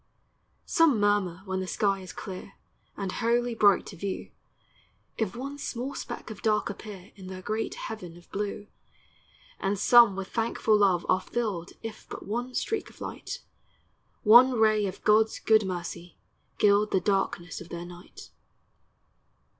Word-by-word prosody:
Some 320 -9 +4
murmur 205 -3 +1
when 190 -1 -2
their 185 - -3
sky 195 0 +1
is 185 -1 -9
clear 190 0 -8 0.4
And 195 -2 -3
wholly 240 +2 +1
bright 205 -4 +4
to - - -9
view, 195 +2 -5 0.8
If 220 -3 -2
one 275 +4 -6
small 260 +1 -4
speck 245 - -6
of 210 - -9
dark 215 -2 +1
appear 200 -2 -10
In 190 -2 -11
their 185 0 -8
great 220 +2 -2
heaven 180 -6 -7
of 175 - -17
blue; 205 +1 -3 0.9
And 200 +1 0
some 235 0 +6
with 195 0 -5
thankful 225 -1 +1
love 190 -4 +3
are 185 0 +3
filled 195 -5 -3
If 225 -1 -8
but - - -8
one 245 +5 -3
streak 445 - -2
of - - -19
light, - - -6 0.8
One 240 +4 +8
ray 215 -3 +3
of 185 - -8
God's 220 +1 +4
good 220 -3 +3
mercy, 175 -1 -6 0.4
gild 205 0 +4
The 190 - +2
darkness 190 -4 -1
of 175 - -11
their 170 0 -6
night. 175 0 -12
205 Hz, 155 wpm, -28 LUFS, 185-225 Hz, 0.9 s, One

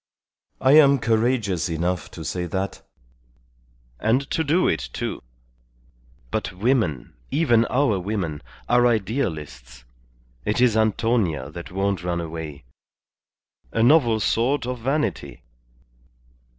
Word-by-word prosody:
I 130 - +3
am 140 -2 +7
courageous 110 -6 0
enough 85 +1 -2
to - - -9
say 90 -1 -3
that, 95 +3 -3 1.2
and 125 +5 +1
to 160 - +1
do 165 +5 +2
it, 65 -7 -1
too. - - -4 1.1
But - - -2
women, 95 - 0 0.2
even 120 -7 +3
our 125 -7 +1
women, 90 -6 -3 0.3
are 120 0 +4
idealists. 80 - -3 0.6
It 105 - -1
is 125 -3 +4
Antonia 110 - +1
that 85 +2 -9
won't 95 -1 -1
run 90 -1 -1
away. 80 -4 -6 1.1
A 115 - +1
novel 120 -4 +4
sort 120 +6 +1
of 125 0 -4
vanity." 135 - -2
110 Hz, 110 wpm, -23 LUFS, 85-125 Hz, 1.2 s, am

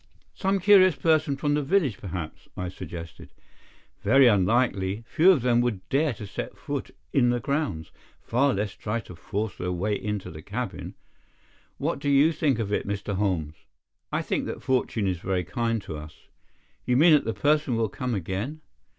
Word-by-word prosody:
"Some 195 0 0
curious 185 -3 +6
person 155 -3 +2
from 145 0 0
the 150 - +2
village, 145 - +1
perhaps," 85 -4 -6
I 90 0 -3
suggested. 85 -3 -9 0.7
"Very 135 +6 +6
unlikely. 105 -1 +2
Few 170 +9 +4
of 160 -11 +5
them 120 -1 +3
would 105 -7 -2
dare 145 +2 +2
to 105 - -8
set 95 - -6
foot - - -4 0.2
in 120 -3 +4
the 120 0 +1
grounds, 130 - -2 0.3
far 135 +4 +1
less 100 +1 -2
try 110 +2 -3
to 90 -3 -12
force 105 +3 -4
their 90 0 -2
way 95 +4 -1
into 105 -1 -3
the 80 0 -9
cabin. 115 +8 -5 0.8
What - - -2
do 145 - -1
you 140 +3 +5
think 150 -5 +1
of 105 -3 -2
it, - - -1
Mr. 100 0 -3
Holmes?" 90 -6 -1 0.6
"I - - 0
think - - -2
that - - -6
fortune 125 -5 0
is 90 -3 -1
very 90 0 -1
kind 115 +3 -1
to 80 - -6
us." 75 +1 -12 0.5
"You 125 - +2
mean 160 +3 +7
that 150 - +4
the 115 - -2
person 145 -4 +2
will 115 -1 +1
come 125 +2 -3
again?" 100 - -4
115 Hz, 180 wpm, -26 LUFS, 95-140 Hz, 0.8 s, mean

